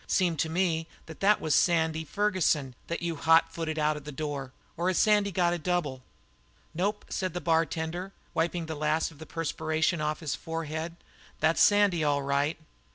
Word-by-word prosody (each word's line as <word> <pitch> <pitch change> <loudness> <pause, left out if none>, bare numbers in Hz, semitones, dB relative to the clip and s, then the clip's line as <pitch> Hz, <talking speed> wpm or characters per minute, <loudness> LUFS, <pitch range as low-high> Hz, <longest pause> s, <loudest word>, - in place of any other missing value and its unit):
Seemed 175 -5 +1
to 160 - +1
me 165 -1 0 0.2
that 160 - -11
that 205 +2 +4
was 155 - 0
Sandy 160 -2 +2
Ferguson 165 -7 +1
that 170 - -3
you 170 -2 -2
hot 165 +2 +4
footed 160 -1 -3
out 155 0 +2
of 150 - -8
that 150 -1 -8
door 145 -3 -4 0.2
or 175 +2 -1
has 185 - +1
Sandy 210 -2 +4
got 175 -1 +2
a 175 - -2
double?" 155 -6 -1 0.7
"Nope," 200 +5 -1
said 185 -1 -2
the - - -1
bartender, 165 +2 -1 0.2
wiping 165 +1 0
the 160 - -4
last 155 +2 0
of 145 - -17
the 160 - -9
perspiration 160 +1 -1
from 150 0 0
his 150 -4 -4
forehead, 160 +2 -4 0.4
"that's 160 +2 +3
Sandy, 205 -5 +4
all 145 -1 +1
right." 140 +3 0
165 Hz, 180 wpm, -28 LUFS, 155-175 Hz, 0.7 s, that